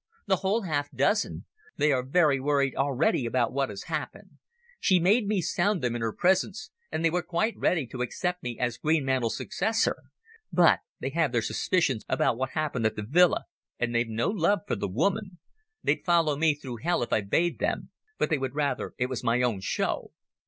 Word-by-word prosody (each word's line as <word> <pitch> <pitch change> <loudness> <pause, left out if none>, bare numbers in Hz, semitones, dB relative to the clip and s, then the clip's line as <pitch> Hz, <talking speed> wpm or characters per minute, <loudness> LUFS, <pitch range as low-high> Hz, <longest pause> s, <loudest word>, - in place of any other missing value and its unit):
"The 190 -2 +2
whole 200 +4 0
half 145 -5 -1
dozen. 145 - 0 0.3
They 150 - +3
are 130 -2 +2
very 140 +1 +3
worried 140 -1 +1
already 135 -2 +1
about 120 0 0
what 135 0 0
has 100 -2 -7
happened. - - -6 0.4
She 185 -2 +4
made 200 +6 +3
me 205 -3 +1
sound 200 -1 0
them 120 -1 0
in 120 - -3
her 115 -1 0
presence, 190 - 0 0.2
and 165 - -1
they 165 - +3
were 180 +1 +1
quite 200 +8 -1
ready 160 -6 +1
to 125 +1 -7
accept 180 +8 -2
me 120 -1 -5
as 120 -2 -2
Greenmantle's 135 -7 +1
successor. 220 +2 0 0.5
But 175 -2 +5 0.2
they 135 - -3
have 160 -2 +1
their 120 -2 +1
suspicions 135 - 0
about - - +2
what 130 +2 -3
happened 145 -7 0
at 110 - -4
the 105 - -4
villa, 175 +7 +4 0.3
and 120 -1 -1
they've 115 0 +1
no 115 - 0
love 200 -1 +1
for - - 0
the 100 - -3
woman... 185 - -1 0.5
They'd - - +1
follow 165 -4 +3
me 155 0 +2
through 130 -5 -7
hell 170 +3 0
if - - -3
I - - +3
bade 165 +13 0
them, - - -2 0.3
but - - 0
they 155 - +2
would 135 0 -3
rather 145 -1 -1
it 125 - +1
was 130 -1 -4
my 120 +1 +2
own 115 -5 0
show." - - -2
145 Hz, 200 wpm, -27 LUFS, 125-180 Hz, 0.5 s, But